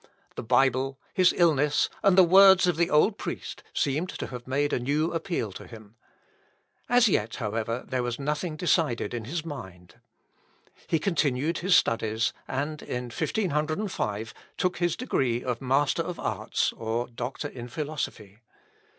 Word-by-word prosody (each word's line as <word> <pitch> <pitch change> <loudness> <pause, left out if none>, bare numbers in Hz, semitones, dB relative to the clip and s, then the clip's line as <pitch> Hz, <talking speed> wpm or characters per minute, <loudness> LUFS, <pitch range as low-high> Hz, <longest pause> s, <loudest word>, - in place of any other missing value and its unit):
The - - -5
Bible, 130 +2 +2
his 185 -1 +5
illness, 150 -4 +3
and 195 -2 +4
the 190 - +9
words 190 +1 +7
of 180 -2 +2
the 170 +1 +1
old 190 +7 +3
priest, - - -6
seemed 150 +6 -1
to - - -5
have 125 -1 -8
made 145 +3 0
a - - +1
new 150 +6 0
appeal 165 - -2
to - - -10
him. 110 -2 -13 0.9
As 245 -1 +5
yet, 115 - 0
however, 115 +1 -3
there 130 -1 -1
was 120 -1 -2
nothing 150 +3 -2
decided 155 - 0
in 115 -3 -4
his 160 +5 -4
mind. 95 - -9 0.9
He 165 - +2
continued 150 -3 0
his 185 +1 +4
studies, 110 0 0
and, 145 +3 -3
in 125 0 -4
1505, 155 - -2 0.2
took 180 -1 0
his 175 0 0
degree 130 - -1
of 125 -1 -3
Master 135 +4 +1
of 175 +1 -5
Arts, - - -1
or 115 +2 -3
Doctor 125 +4 -5
in 120 -3 -8
Philosophy. 120 -7 -5
140 Hz, 150 wpm, -27 LUFS, 120-170 Hz, 0.9 s, the